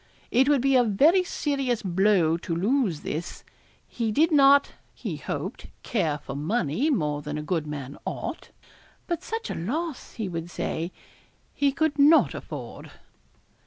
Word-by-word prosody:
It 265 +3 +4
would 285 -4 +4
be 270 +1 +3
a 250 - +6
very 290 - +4
serious 275 -9 -1
blow 185 -3 +3
to 170 0 -4
lose 200 - +1
this. 165 +4 -5 0.4
He 230 -3 -2
did 320 +9 +3
not, 280 -1 +6 0.2
he - - -5
hoped, - - -5 0.2
care 165 - 0
for 135 -1 -8
money 165 - 0
more 150 - 0
than 150 0 -5
a 150 - -4
good 160 -1 -2
man 140 -2 -6
ought; - - -5 0.6
but 340 -2 -2
such 455 +3 -4
a - - -2
loss, 290 - -4
he 220 -4 -4
would 170 -1 -5
say, 170 0 -3 0.6
he 280 -1 +2
could 305 +1 0
not 300 +3 +6
afford. - - -8
220 Hz, 155 wpm, -26 LUFS, -, 0.6 s, a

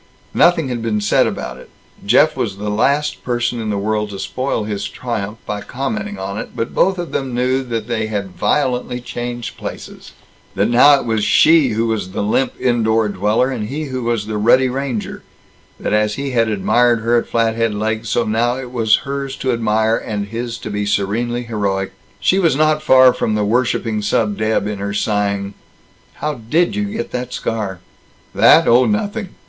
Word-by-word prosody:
Nothing 165 -5 +3
had 120 -2 -3
been 110 -2 -1
said 105 - +3
about - - -5
it; - - -14 0.3
Jeff 145 +9 +4
was 100 -4 -3
the 105 +1 -3
last 140 +8 0
person 120 -1 -1
in 110 - -3
the 105 - -1
world 105 +1 -1
to 100 - -7
spoil 130 +1 -2
his 105 -1 -3
triumph 110 -4 -4
by 105 -1 -4
commenting 110 -7 -4
on 100 +2 -4
it; - - -8
but 115 - -3
both 190 0 +2
of 175 -1 -5
them 130 -3 -3
knew 130 +2 +1
that 115 -3 -4
they 110 -2 -1
had 100 -3 -3
violently 125 -3 0
changed 120 0 -6
places; - - -8 0.4
that 100 +3 +1
now 140 +4 +6
it - - -6
was 110 -2 0
she 155 +7 +5
who 115 +2 0
was 110 -5 -2
the - - -2
limp 125 +5 0
indoor 115 -3 +1
dweller, 105 +6 +1
and 105 -5 -3
he 150 +3 -3
who 130 -3 -4
was 115 -3 -1
the 105 0 -3
ruddy 130 +5 +4
ranger; 130 -4 -4 0.6
that - - -2
as 105 0 +1
he 140 0 -3
had 115 -3 +2
admired 115 +3 +2
her 120 +2 +3
at - - -7
Flathead 115 -1 +1
Lake, 110 +1 -1
so 115 +1 0
now 115 +3 0
it 130 -2 -7
was 115 -3 +3
hers 140 -1 -4
to 130 -1 -1
admire, 110 -1 +1
and 100 -1 -4
his 115 +1 -4
to 110 - -7
be 105 0 -2
serenely 115 +5 -1
heroic. 100 -4 -2 0.3
She 185 - +2
was 165 -7 +3
not 155 +1 +2
far 130 -4 +6
from 110 - -1
the 105 -1 0
worshiping 115 -1 0
sub 105 0 0
deb 110 -1 0
in 105 -1 -4
her 100 0 -3
sighing, 100 -1 -1 0.6
"How 150 0 -3 0.2
did 175 +7 +2
you 205 0 -1
get 215 +3 -5
the 125 0 -3
scar?" 105 -7 -4 0.5
"That? - - +6
Oh, 120 +2 +5
nothing." 210 -2 -2
115 Hz, 190 wpm, -18 LUFS, 105-130 Hz, 0.6 s, now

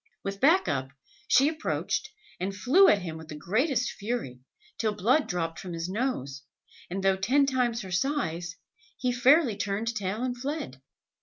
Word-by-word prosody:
With 195 0 -5
back 325 +7 +5
up, 135 -1 -1 0.4
she 270 +2 +5
approached, 315 0 -2 0.3
and 195 +2 -3
flew 280 - +5
at 200 -3 +4
him 160 -2 -5
with 160 - -11
the 155 - -7
greatest 240 - 0
fury, 205 - -4 0.4
till 215 -2 0
blood 245 +10 +2
dropped 165 -3 -3
from 180 -2 -7
his 165 0 -3
nose, 185 - -3 0.5
and 190 +2 -4
though 195 -1 +3
ten 260 +9 +3
times 245 -4 0
her 190 - -8
size, 175 - -1 0.4
he 250 -2 0
fairly 250 0 +4
turned 210 +4 -2
tail 205 +3 -2
and 250 -1 -1
fled. 250 - -5
210 Hz, 165 wpm, -28 LUFS, 180-255 Hz, 0.5 s, back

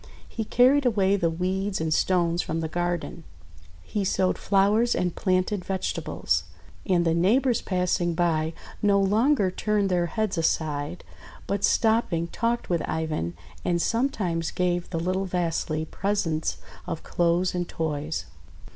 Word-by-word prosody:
He 225 - -4
carried 260 +6 +4
away 200 -5 +3
the 170 -4 +1
weeds 190 +4 -1
and 160 -1 0
stones 175 -1 +2
from 160 - -3
the 160 - -2
garden. 175 0 -3 0.6
He 205 - -2
sowed 185 -1 +1
flowers 210 +4 +3
and 180 -2 0
planted 185 +1 0
vegetables. 190 0 -1 0.4
And 175 -3 +3
the 165 - +3
neighbours 230 +9 +3
passing 180 -2 0
by 160 -2 +1 0.3
no 200 -1 +4
longer 210 +2 +3
turned 205 0 0
their 175 -1 +2
heads 210 -1 -1
aside, 155 0 -1 0.4
but 200 0 -2
stopping 220 -7 +2
talked 235 +4 -1
with 170 -2 0
Ivan, 155 - -2 0.3
and 175 -1 +1
sometimes 185 -8 0
gave 175 -1 -1
the 165 - -2
little 185 +3 -1
Vasily 165 -3 -1
presents 170 -4 -1 0.3
of 165 -3 -4
clothes 175 +1 +1
and 175 -1 -2
toys. 155 -1 -3
180 Hz, 140 wpm, -26 LUFS, 165-200 Hz, 0.6 s, carried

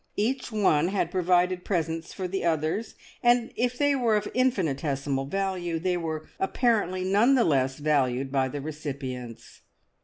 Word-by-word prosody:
Each 250 +4 -1
one 180 -7 +3
had 185 -3 -1
provided 180 0 +2
presents 165 -3 -2
for 185 -2 -4
the 190 +2 -3
others, 165 +6 -1 0.3
and 240 -1 +3
if 245 +1 0
they 285 0 +3
were 240 -5 +2
of 210 - 0
infinitesimal 145 - 0
value, 185 -1 -2
they 180 +2 0
were 160 -2 -4
apparently 195 -3 +1
none 210 +8 +4
the 245 - +4
less 135 -5 +1
valued 135 -3 +1
by 135 -1 +1
the 145 +2 -5
recipients. 130 -6 -7
175 Hz, 150 wpm, -27 LUFS, 145-205 Hz, 0.3 s, none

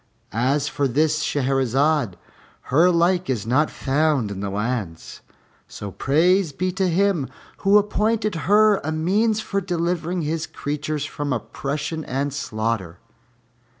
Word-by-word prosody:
As 130 +7 +1
for 145 -1 0
this 155 +4 +1
Shahrazad, 135 - +1 0.6
her 165 +6 +6
like 175 0 +2
is 115 -6 -1
not 130 +7 +2
found 140 -5 0
in 100 - -5
the 100 0 -3
lands; 105 -4 -4 0.5
so 100 -1 -7
praise 170 - +2
be 185 +6 -2
to 190 0 0
Him 175 -5 +1 0.3
Who 200 +1 +4
appointed 215 +1 +1 0.2
her 210 0 +6
a 155 - -4
means 205 +8 +1
for 200 -2 -2
delivering 175 -1 -1
His 155 +1 -2
creatures 150 0 -3
from 145 -1 -4
oppression 145 +6 -3
and 135 +2 -2
slaughter!" 110 -9 -3
150 Hz, 130 wpm, -22 LUFS, 130-180 Hz, 0.6 s, her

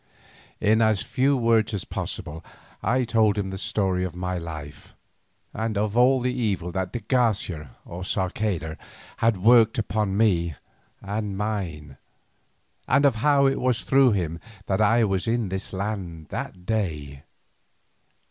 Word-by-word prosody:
In 110 +2 +3
as 110 -3 +3
few 135 +1 +1
words 115 -3 +2
as 100 - -4
possible 80 +2 -5 0.4
I 130 +1 +1
told 110 -3 +2
him 100 -2 -1
the 95 - -5
story 95 -3 0
of 90 -2 -4
my 90 +1 -3
life, 75 -3 -9 0.6
of 110 -1 -1
all 130 +2 +5
the 125 0 0
evil 100 -8 -1
that 95 0 -2
de 120 - -4
Garcia 95 - 0
or 85 +1 -8
Sarceda 95 -4 -2 0.4
had 115 -2 +2
worked 115 -1 +6
upon 105 -2 -1
me 85 -7 +2 0.5
and 100 0 -3
mine, 90 -10 -4 0.9
and 140 +2 +4
of 135 -5 +3
how 140 +3 +4
it 135 0 +2
was 125 -3 +1
through 135 -3 +4
him 85 -4 -2 0.3
that 95 +2 0
I 115 +3 +4
was 95 -2 0
in 115 -3 0
this 95 +1 -4
land 95 -5 -4
that 90 -1 -6
day. 75 -11 -2
105 Hz, 145 wpm, -25 LUFS, 90-115 Hz, 0.9 s, worked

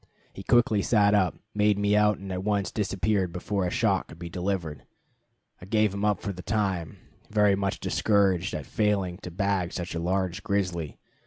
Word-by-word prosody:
He - - -8
quickly 120 -4 +3
sat 105 -1 +3
up, 95 -4 +2 0.2
made 105 -1 +3
me 100 0 +2
out, 105 -1 +4
and 95 0 -8
at 90 0 -3
once 100 -1 0
disappeared 100 -2 0
before 90 +2 -2
a - - -1
shot 100 -1 +1
could 80 - -12
be 85 0 -8
delivered. 90 -5 -3 0.8
I - - -9
gave 105 -1 +2
him 100 0 -4
up 105 -1 +1
for 100 - -3
the 90 - -8
time, 95 -6 -2 0.3
very 105 -2 +4
much 100 0 -2
discouraged 95 -3 +1
at 75 - -5
failing 100 -4 0
to 90 - -7
bag 95 0 -1
such 90 -1 -4
a 85 - -2
large 95 +1 -1
grizzly. 90 -7 -2
100 Hz, 185 wpm, -27 LUFS, 90-105 Hz, 0.8 s, out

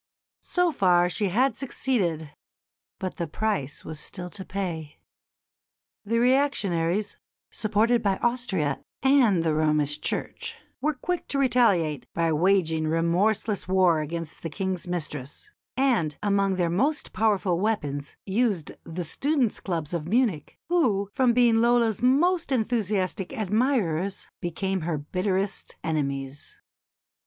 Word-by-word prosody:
So 360 -1 +2
far 180 - +3
she 200 +2 0
had 255 +8 +2
succeeded, 180 - -1 0.6
but 185 -2 -5
the 170 - -2
price 160 -6 -2
was 155 -1 -6
still 180 +3 -6
to 190 - -6
pay. 170 -6 -5 1.1
The 225 +3 0
reactionaries, 210 -8 +1 0.3
supported 225 +3 +2
by 195 -2 +1
Austria 205 - -1 0.2
and 250 -10 +4
the 160 -2 +1
Romish 150 -1 +1
Church, - - -3 0.3
were 305 +1 +1
quick 355 +6 -3
to 280 - -1
retaliate 210 - +2
by 165 -1 +1
waging 160 -2 +2
remorseless 180 +6 +1
war 185 -3 +4
against 160 +1 -4
the 165 - -4
King's 185 +1 -3
mistress; 150 -6 -5 0.3
and, 230 - +2
among 200 -1 +2
their 175 -2 0
most 280 - 0
powerful 200 -5 +1
weapons, 145 -10 -2
used 200 -5 0
the 175 +2 -5
students' 265 - 0
clubs 165 -4 -3
of 165 -2 -3
Munich, 210 - 0
who, 220 - +1
from 255 -3 +3
being 235 -1 +4
Lola's 235 -2 +3
most 320 +7 +3
enthusiastic 210 -6 0
admirers, 205 - 0
became 190 +2 -2
her 160 -1 -1
bitterest 185 +6 -2
enemies. 140 -3 -3
190 Hz, 125 wpm, -26 LUFS, 165-235 Hz, 1.1 s, and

